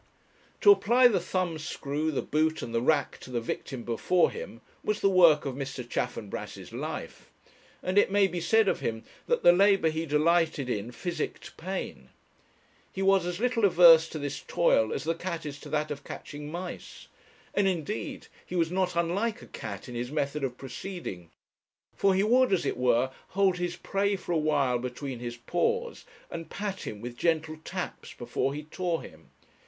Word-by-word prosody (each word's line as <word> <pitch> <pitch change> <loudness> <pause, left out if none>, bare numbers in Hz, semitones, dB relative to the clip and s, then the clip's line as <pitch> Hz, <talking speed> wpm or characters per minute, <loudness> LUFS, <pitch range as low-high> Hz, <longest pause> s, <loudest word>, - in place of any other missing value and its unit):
To 410 - +9
apply 250 - +5
the 200 -5 +2
thumbscrew, 160 -4 -2
the 150 - -1
boot, 155 +1 0
and 115 - -6
the 115 - +1
rack 145 +3 +1
to - - -11
the 120 -2 -1
victim 120 +2 -5
before 145 +10 +2
him 475 +2 -8 0.2
was 210 0 0
the 195 - +3
work 170 -6 +6
of 135 - -2
Mr. 135 -2 -5
Chaffanbrass's 120 -4 -4
life. - - -6 0.5
And 185 +2 +3
it - - +3
may 200 0 +4
be 180 -2 -2
said 220 +5 +3
of - - +1
him 110 -1 -3 0.2
that 485 - +1
the 175 - +8
labour 195 -2 +4
he 160 +1 -3
delighted 155 -2 +2
in 110 +2 -3
physicked 170 +5 -5
pain. 190 +3 -5 0.8
He 195 - -3
was 195 -2 +4
as 180 +1 -3
little 245 -1 +1
averse 170 -4 +7
to - - -6
this 145 -1 -4
toil 110 -10 +2
as - - -3
the 165 - 0
cat 170 -1 -5
is 145 -1 -6
to - - -10
that 150 0 -1
of 140 -1 -5
catching 145 0 -8
mice. 175 +1 -7 0.5
And, 200 -1 +2
indeed, 155 - -3 0.2
he 180 - -7
was 165 -1 +1
not 180 -1 0
unlike 200 +8 0
a - - -12
cat 100 -3 -7
in 125 - -8
his 120 +2 -4
method 150 -1 -1
of 125 -2 -2
proceeding; 130 - -7 0.7
for 195 -1 +3
he 190 - +3
would, 250 +3 +4
as 190 - +2
it - - 0
were, 125 +1 +2 0.2
hold 195 -2 +2
his 175 0 -2
prey 200 +3 0
for 185 - -6
a - - +2
while 145 -5 +2
between 125 +1 -5
his 120 0 -5
paws, 470 - -1 0.3
and 165 - -6
pat 200 -1 -4
him 105 -1 -6
with 120 +1 -6
gentle 160 0 0
taps - - -6
before 135 +1 -2
he 150 - -5
tore 170 +2 -2
him. - - -14
165 Hz, 185 wpm, -28 LUFS, 135-190 Hz, 0.8 s, To